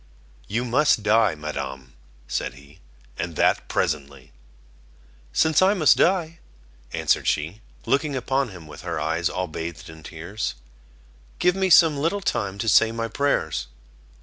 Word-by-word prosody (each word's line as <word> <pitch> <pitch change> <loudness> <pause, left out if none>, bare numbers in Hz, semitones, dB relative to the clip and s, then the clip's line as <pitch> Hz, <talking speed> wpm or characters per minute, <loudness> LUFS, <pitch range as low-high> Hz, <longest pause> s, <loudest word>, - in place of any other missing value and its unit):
"You 115 +4 -1
must 125 -2 +2
die, 110 -2 +3
Madam," 65 -4 -6 0.3
said 65 - -3
he, 70 +4 -17 0.4
"and 85 0 -4
that - - +2
presently." 70 -3 -2 1.0
"Since 160 +1 +3
I 195 +2 +4
must 155 -6 +5
die," 170 -2 +1 0.5
answered - - +1
she, 80 +9 -1 0.2
looking 140 0 +1
upon 130 +1 0
him 90 -5 -11
with 75 -1 -11
her 85 -2 -3
eyes 80 +3 0
all 90 - -2
bathed 80 +1 -7
in 80 0 -13
tears, 85 +7 -5 0.8
"give 180 0 +2
me 190 -1 +1
some 160 -4 +6
little 165 +7 0
time 100 - -2
to 115 - -3
say 110 +2 +5
my 115 0 -3
prayers." 140 - -1
100 Hz, 145 wpm, -24 LUFS, -, 1.0 s, some